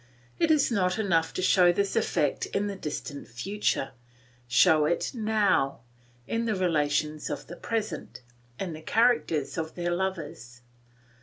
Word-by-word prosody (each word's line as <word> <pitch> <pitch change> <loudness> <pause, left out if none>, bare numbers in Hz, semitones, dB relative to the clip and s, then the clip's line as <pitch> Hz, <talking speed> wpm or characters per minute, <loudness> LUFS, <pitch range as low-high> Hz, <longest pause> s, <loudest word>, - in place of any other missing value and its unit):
It 330 - +3
is 305 -5 +3
not 185 -4 +1
enough 170 -7 +1
to 185 - -1
show 180 -1 +5
this 200 +2 -1
effect 145 - 0
in 200 - -1
the 200 -1 -3
distant 145 -4 -6
future, 135 - -2 0.6
show 155 +6 +5
it 170 +3 0
now, 210 - +1 0.4
in 230 - -1
the 220 -2 0
relations 150 -4 0
of - - -4
the 175 - -9
present, 215 - -4 0.4
in 185 -4 -3
the 155 - -8
character 225 - +2
of 160 -1 -4
their 175 0 -2
lovers. 160 -10 -4
175 Hz, 145 wpm, -27 LUFS, 150-205 Hz, 0.6 s, show